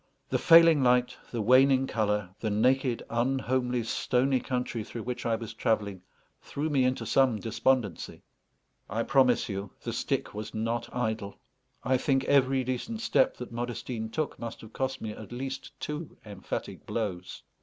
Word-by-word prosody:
The - - +1
failing 165 -3 +7
light, 125 -1 +3
the 115 -3 -2
waning 130 +3 +5
colour, 105 -6 -1
the 110 - -1
naked, 125 +3 +2
unhomely, 125 0 0
stony 130 +3 +1
country 125 -3 -3
through 115 +1 -7
which 125 -1 -4
I 115 - +2
was 110 -1 -6
travelling, 105 -5 -1 0.4
threw 150 +2 -3
me 135 -3 +3
into 130 0 0
some 130 -5 +3
despondency. 115 -3 -1 0.7
I 115 +4 -1
promise 130 -2 +3
you, 100 -1 -4
the - - -3
stick - - -2
was 105 +1 -6
not 115 +2 -2
idle; 110 -4 -3 0.5
I 130 +2 +2
think 135 0 +1
every 135 -1 +3
decent 130 - -3
step - - +2
that - - -7
Modestine 120 -1 -4
took 155 +5 -3
must 115 -1 -6
have 110 0 -13
cost 130 0 -2
me 110 - -4
at 105 +1 -10
least 130 +2 -6
two 150 +4 -5
emphatic 100 -3 -6
blows. 95 -5 -4
125 Hz, 155 wpm, -29 LUFS, 110-130 Hz, 0.7 s, failing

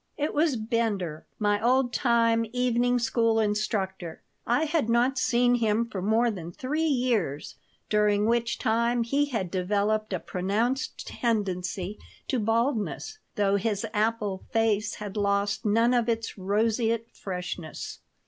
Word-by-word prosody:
It 295 +1 -1
was 305 -2 +2
Bender, 215 -8 -2
my 205 0 +1
old 250 +1 +3
time 230 -2 +3
evening 245 0 +2
school 230 -1 +2
instructor. 205 -5 -2 0.2
I 245 +6 +2
had 305 -6 0
not 245 +3 +2
seen 245 -1 +3
him 225 -1 +2
for 200 -5 -5
more 225 +4 +2
than 175 -5 -7
three 270 - -3
years, 235 - 0 0.3
during 210 -1 +2
which 235 +1 +1
time 235 +2 +1
he 275 +5 +1
had 225 -11 -3
developed 205 +3 0
a 185 - -1
pronounced 220 +11 -2
tendency 195 -3 -2 0.3
to 260 - +1
baldness, 230 - -1 0.2
though 200 -2 +2
his 205 +1 -1
apple 210 -3 0
face 220 -2 +1
had 205 -1 -7
lost 200 0 0
none 230 +4 +3
of 240 -1 +2
its 230 -1 -2
roseate 225 +3 0
freshness. 180 -4 -6
225 Hz, 135 wpm, -27 LUFS, 205-240 Hz, 0.3 s, old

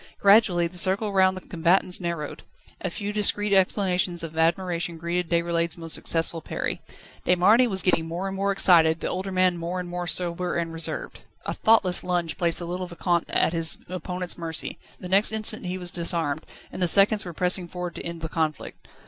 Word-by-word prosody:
Gradually 200 -4 +4
the 175 +1 -2
circle 200 +3 +2
round 190 -1 +3
the - - -7
combatants 180 +2 +1
narrowed. 170 -4 -4 0.4
A - - -2
few 205 -1 -5
discreet 210 0 +1
exclamations 185 -2 +1
of 160 -1 -7
admiration 170 +1 0
greeted 170 +1 -3
Déroulède's 170 0 0
most 165 -1 0
successful 165 0 -1
parry. - - -4 0.4
De 180 - +4
Marny 215 +8 +4
was 190 -4 -1
getting 165 -3 +1
more 175 +4 -4
and 195 - -5
more 200 +1 0
excited, 165 -4 +5
the - - -3
older 190 +1 -3
man 185 -1 +2
more 175 +2 -3
and 180 - -5
more 175 0 -5
sober 175 0 -1
and 165 -1 -2
reserved. 165 -1 -5 0.3
A - - -2
thoughtless 210 -5 +3
lunge 175 -2 -2
placed 170 -2 +2
the 175 - +1
little 180 +1 -4
Vicomte 175 0 -1
at - - +2
his 165 -1 -1
opponent's 180 0 -4
mercy. 165 -1 -4 0.2
The 180 - -7
next 195 +4 +3
instant 215 -2 -1
he 180 +1 -3
was 180 -1 -4
disarmed, 165 -3 -1 0.2
and - - -7
the 180 - +3
seconds 200 +4 +5
were 175 - -7
pressing 180 +1 +1
forward 180 0 -6
to - - -8
end 170 -1 -6
the 160 - -3
conflict. 160 -2 -4
180 Hz, 195 wpm, -25 LUFS, 170-190 Hz, 0.4 s, excited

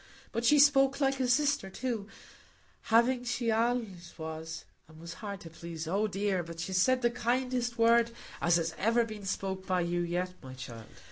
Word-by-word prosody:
But 230 - -2
she 295 +5 +5
spoke 275 -1 +5
like 270 -1 +1
a 255 - +1
sister, 280 -5 +2
too; 230 -1 -3 0.8
having 240 +2 +3
she 245 -1 -1
allays 220 -6 -1
was, 160 0 -6 0.2
and 160 +1 -13
hard 200 +3 -6
to 165 - -10
please,—oh 170 +5 -2
dear!—but 185 -4 -2
she's 185 +2 0
said 255 +3 +3
the 240 - +3
kindest 245 0 -1
word 230 0 +5 0.3
as 170 0 +4
has 165 -1 0
ever 230 +3 +3
been 215 -3 -8
spoke 190 0 -3
by 185 -1 +1
you 175 0 -1
yet, 175 +1 -2
my 130 -1 -10
child. 120 -4 -9
205 Hz, 165 wpm, -31 LUFS, 170-240 Hz, 0.8 s, she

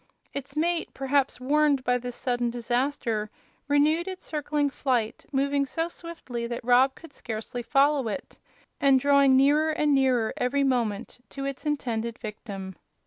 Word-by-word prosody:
Its 280 0 -6
mate, 335 +2 0
perhaps 270 0 0
warned 285 +1 +2
by 250 -1 +2
this 245 0 -4
sudden 245 -1 -1
disaster, 240 -2 -1 0.4
renewed 305 +4 +3
its 375 -1 -7
circling 295 -1 -1
flight, 250 -5 -1
moving 280 0 +1
so 325 +5 -2
swiftly 325 -9 -6
that 235 0 -5
Rob 255 +2 +4
could 330 -3 -14
scarcely 225 +1 -5
follow 275 +1 +2
it, 220 +6 -6 0.4
and 275 -1 +5
drawing 280 -1 +5
nearer 295 +4 +4
and 300 -1 +2
nearer 255 -5 +2
every 275 +3 +1
moment 240 -6 -1
to 275 0 -6
its 275 +2 -5
intended 235 -5 -2
victim. 200 -4 -7
270 Hz, 145 wpm, -26 LUFS, 240-290 Hz, 0.4 s, and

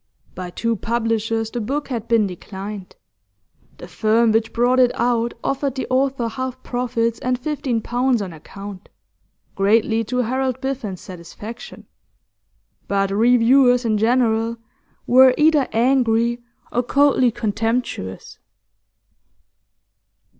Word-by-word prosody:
By 180 -1 -6
two 230 +5 -1
publishers 225 0 -1
the 240 - -3
book 285 +7 -3
had 235 -3 -4
been 230 -2 +3
declined; 195 +1 -8 0.8
the - - -10
firm 220 +1 +2
which 225 +1 +1
brought 245 +2 +2
it 250 -1 +5
out 235 -1 0
offered 275 -1 -1
the 265 - -3
author 260 -2 +1
half 260 +2 -5
profits 230 -2 -1
and 255 0 -1
fifteen 265 -3 -2
pounds 245 +2 0
on 190 -4 -5
account, 195 +5 -10 0.6
greatly 220 +3 +2
to 250 +3 -1
Harold 260 +1 -1
Biffen's 260 -9 -4
satisfaction. 185 +6 -10 1.0
But 195 -1 0
reviewers 245 +3 +4
in 215 -2 +1
general 230 0 +1 0.5
were 255 +1 +6
either 300 -3 +4
angry 235 -1 +2 0.3
or 245 - +1
coldly 265 0 +3
contemptuous. 225 - -3
235 Hz, 115 wpm, -21 LUFS, 220-255 Hz, 1.0 s, were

